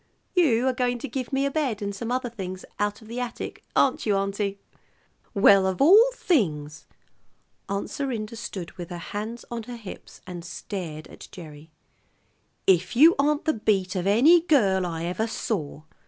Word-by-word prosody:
You 270 -10 +3
are 260 - +2
going 245 -1 0
to - - -6
give 255 0 -5
me 270 0 +1
a 280 - 0
bed 270 -8 -1
and 200 -1 -3
some 230 +4 -5
other 255 0 -1
things 185 -4 -6
out 205 +1 -1
of - - -15
the 235 +2 -5
attic, 245 -1 -5
aren't 265 - +3
you, 205 - +3
auntie?" 200 0 -1 0.8
"Well, 195 -1 +6
of 190 -1 -2
all 405 - +7
things!" 155 - -1 0.8
Aunt 200 0 -2
Serinda 235 -6 -3
stood 190 -6 -6
with 175 - -6
her 175 - -6
hands 215 +7 -6
on 235 -1 -3
her 240 +2 -8
hips, 215 -5 -11
and 180 -2 -7
stared 165 -3 -6
at - - -12
Gerry. 155 -3 -11 1.0
"If 185 +2 +3
you 315 +7 +8
aren't 295 +1 +1
the 315 - +2
beat 195 -3 0
of 185 0 -1
any 285 - +6
girl 200 - +2
I 165 -1 -4
ever 185 +6 -1
saw! 155 -10 -4
210 Hz, 175 wpm, -25 LUFS, 185-250 Hz, 1.0 s, you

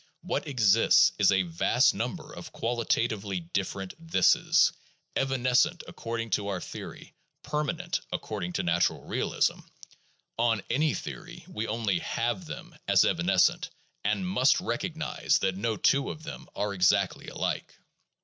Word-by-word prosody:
What - - -2
exists 115 -6 +5
is 100 -1 +5
a 95 -1 +3
vast 85 -1 +2
number - - -4
of - - -9
qualitatively 115 -4 -1
different 95 +2 -4
"thises," 165 - +4 0.4
evanescent 135 +5 +2
according 115 -1 -5
to 100 +1 0
our 95 -2 -2
theory, - - -9 0.3
permanent 165 +3 -2
according 90 -5 -4
to - - -1
natural 85 0 +1
realism; - - 0 0.8
on 115 -4 +2
any 150 +3 +2
theory 170 0 -8
we 115 -11 -4
only 110 -5 0
have 115 -1 -2
them - - -9
as - - +5
evanescent, - - +2 0.3
and 185 - 0
must 135 -7 +3
recognize 170 -3 -1
that 95 -1 0
no 110 +2 -1
two 140 0 +2
of 155 - -7
them 165 - -8
are 100 0 -1
exactly 90 -1 +2
alike. - - -3
115 Hz, 130 wpm, -28 LUFS, 95-145 Hz, 0.8 s, exists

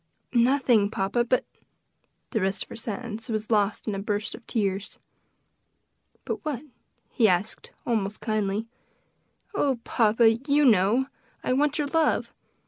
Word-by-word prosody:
"Nothing, 245 -4 +4
papa, 205 +3 0
but 245 +1 +1 0.4
" - - -46
the 220 - 0
rest 195 +1 0
of - - -18
her - - -8
sentence 225 +1 -5
was 215 0 -3
lost 210 0 +1
in 215 - 0
a 195 - -3
burst 205 +1 -2
of 240 - -10
tears. 200 -3 -1 1.3
"But - - -4
what?" 290 -4 -3 0.5
he 230 -5 +4
asked 185 +4 -1 0.2
almost 210 -3 -1
kindly. 215 -1 -1 0.9
"Oh, 280 -10 +1
papa! 225 0 +3 0.2
you 290 +1 +4
know! 220 +3 +4 0.4
I - - +1
want 290 +2 +2
your 300 - 0
love. 315 +2 +1
225 Hz, 140 wpm, -26 LUFS, 205-255 Hz, 1.3 s, Nothing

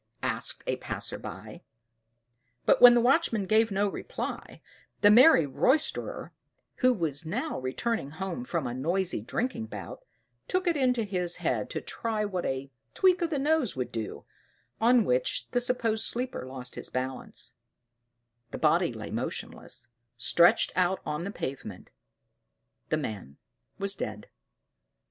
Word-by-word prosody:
asked - - 0
a - - -1
passer - - -4
by. - - -9 1.0
But - - +4
when 245 -1 +10
the 240 - +4
watchman 245 - +2
gave 220 +3 +3
no 200 0 +1
reply, 195 - -5 0.4
the 205 - +7
merry 240 - +7
roysterer, 265 - 0 0.5
who 255 -1 +4
was 165 - -1
now 240 - -3
returning 135 - -2
home 190 - -5
from 170 - -2
a 120 - -3
noisy 170 - -1
drinking 230 - -3
bout, - - -8 0.4
took 370 +1 0
it 345 -2 +2
into 250 -4 +2
his 180 -4 -2
head - - -1
to - - -4
try 220 -2 -2
what 185 -4 -2
a 135 +1 -3 0.2
tweak 370 -2 +4
of 340 - +1
the 305 - -1
nose 290 - +1
would 125 -1 -3
do, 115 -2 -5 0.5
on 235 0 +5
which 125 0 0
the 245 - +1
supposed 235 -3 +1
sleeper 245 - -3
lost 130 -1 -7
his - - -3
balance, 130 -2 -4 1.0
the - - -6
body - - +3
lay - - -7
motionless, 120 0 -5 0.3
stretched 170 +8 +4
out 185 +1 +2
on 150 +3 -3
the - - -3
pavement: 135 -9 -6 1.0
the - - +2
man 100 -10 -6 0.4
was 200 0 0
dead. 105 -1 -6
200 Hz, 145 wpm, -28 LUFS, -, 1.0 s, when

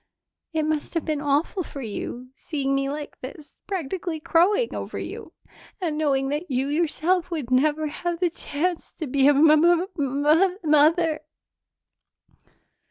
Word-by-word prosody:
It 320 -1 0
must 305 +1 -2
have 330 - -1
been 305 -2 -1
awful 295 +7 0
for 280 -5 -7
you, 240 +3 -6
seeing 275 -3 -2
me 275 0 0
like 295 +1 -6
this, 285 +3 -10
practically 345 -2 -3
crowing 390 +10 +2
over - - -5
you, - - -7 0.5
and 335 -5 -2
knowing 275 -3 +1
that 300 +5 -3
you 265 +1 0
yourself 340 +3 0
would 300 -8 -4
never 300 +4 +2
have 340 +3 -3
the 355 -2 +1
chance 335 +2 -3
to 320 - -5
be 270 0 +3
a 290 - +6
m 300 +2 +6
m 305 +1 +5 0.4
m 300 +7 +2
mother." 310 +1 +3
305 Hz, 150 wpm, -24 LUFS, 280-335 Hz, 0.5 s, a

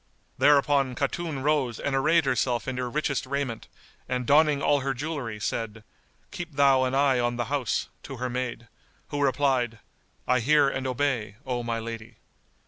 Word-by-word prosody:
Thereupon 140 -2 +4
Khatun 145 +1 -2
rose 140 -6 +1
and 140 - -1
arrayed 155 +4 +3
herself 125 -1 0
in 130 -1 -3
her 125 -1 -2
richest 140 -1 -1
raiment, 135 -4 -3 0.4
and 125 -1 -1
donning 150 +1 +4
all 145 +1 +3
her 135 -1 -2
jewellery 135 -6 -4
said, 115 0 -3 0.5
"Keep 175 -3 -6
thou 135 -2 +4
an 130 +1 -1
eye 135 -2 +3
on 120 0 0
the 120 0 -2
house," 130 -7 0
to 135 - -8
her 125 +1 -2
maid, 125 -1 -4 0.4
who 145 -1 -2
replied, 130 -4 +1 0.5
"I 125 0 +3
hear 145 +4 +4
and 130 -1 -2
obey, 125 -5 -1
O 125 -2 -2
my 115 -1 -2
lady." 115 0 -7
130 Hz, 165 wpm, -26 LUFS, 120-145 Hz, 0.5 s, Thereupon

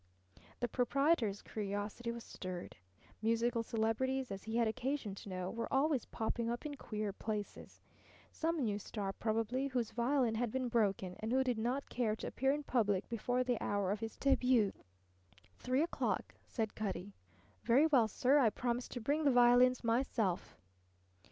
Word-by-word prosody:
The 245 - +1
proprietor's 245 -3 +1
curiosity 205 +3 -3
was 235 0 -7
stirred. 185 -2 -7 0.5
Musical 230 +1 +1
celebrities, 230 +3 -1
as 195 +1 -6
he 220 +1 -3
had 235 -1 +3
occasion 245 -1 -2
to 200 +1 -9
know, 185 0 -3
were 230 0 -4
always 275 -2 +2
popping 230 +1 -2
up 240 +5 -3
in 295 - -3
queer 215 -6 -4
places. 210 0 -5 0.5
Some 325 -1 -1
new 205 -2 -1
star 200 -1 -4
probably, 225 +5 -1
whose 250 -4 -1
violin 245 0 +1
had 235 +1 0
been 255 0 -1
broken 195 -5 0
and 220 +1 -3
who 265 +1 +3
did 250 -3 0
not 250 +5 -1
care 225 -4 0
to - - -7
appear 270 +2 +1
in 295 +1 -1
public 210 -8 +1
before 245 +2 0
the 245 -2 -1
hour 200 -2 0
of 205 - -1
his 225 0 -5
debut. 255 -6 +3 0.9
"Three 255 +4 +1
o'clock," 340 - -1
said 220 -3 -2
Cutty. 200 -2 -4 0.5
"Very 265 +6 +5
well, 265 -8 +4
sir. 260 +7 +3
I 240 -5 +5
promise 245 +2 -2
to 245 - -6
bring 290 +7 +1
the 290 - +5
violins 245 +1 +5
myself." 230 -5 0
235 Hz, 165 wpm, -35 LUFS, 215-255 Hz, 0.9 s, Very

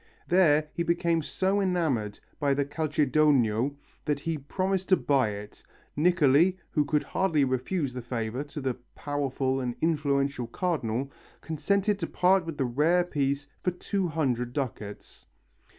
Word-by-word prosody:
There 155 -4 +4
he - - -2
became 170 -1 +1
so 190 +6 0
enamoured 155 - 0 0.2
of 140 -1 +2
the 140 - +1
"calcedonio" 145 -4 +2 0.3
that 145 -2 -1
he 165 -1 -2
proposed 190 +6 -2
to 185 - +6
buy 135 -6 +2
it. 105 0 -8 0.3
Niccoli, 170 +2 +4
who 150 -2 +2
could 150 +1 +1
hardly 165 -7 +1
refuse 130 +3 -1
the 125 - -5
favour 120 +1 -3
to 150 0 -7
the 130 -1 0 0.2
powerful 135 -2 -1
and 125 -2 -3
influential 140 -5 0
Cardinal, 135 -4 -2 0.3
consented 200 +6 0
to - - -2
part 180 -1 +2
with 160 -3 -5
the 135 - +1
rare 155 +9 +3
piece 140 -4 -1 0.2
for - - +1
200 160 - -1
ducats. 110 -7 -6
145 Hz, 140 wpm, -28 LUFS, 130-170 Hz, 0.3 s, to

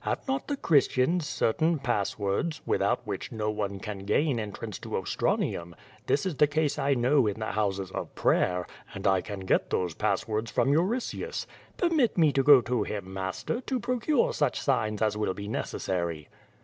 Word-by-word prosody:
Have - - -3
not 265 0 -1
the 285 - -2
Christians 150 - +2
certain 160 +7 +1
passwords, 110 - -1
without - - +1
which - - -5
no 110 -1 -1
one 100 -2 -3
can 105 0 -6
gain 120 +7 +1
entrance 105 -1 -6
to - - -4
Ostranium? 85 0 -1 0.3
This 140 - +1
is 175 -7 -2
the 150 - +5
case 150 0 0
I 140 0 +2
know 125 0 +3
in 105 - -1
the 110 - -2
houses 100 -3 -1
of - - -5
prayer, 90 -1 +2 0.3
and 95 - -6
I 95 -2 +4
can 100 -2 -6
get 95 - +1
those 90 -3 -1
passwords 110 +5 -1
from 140 - +2
Euritius. 195 - -1 0.3
Permit 320 - +2
me 160 -4 +5
to 135 - +3
go 140 -1 +8
to 120 -1 -1
him, 100 -2 -4
master, 95 - -3
to 260 0 -2
procure 290 - +1
such - - 0
signs 110 -6 0
as 105 -1 +1
will 100 -3 -1
be 100 +1 -6
necessary." 85 -7 -3
110 Hz, 175 wpm, -28 LUFS, 100-155 Hz, 0.3 s, go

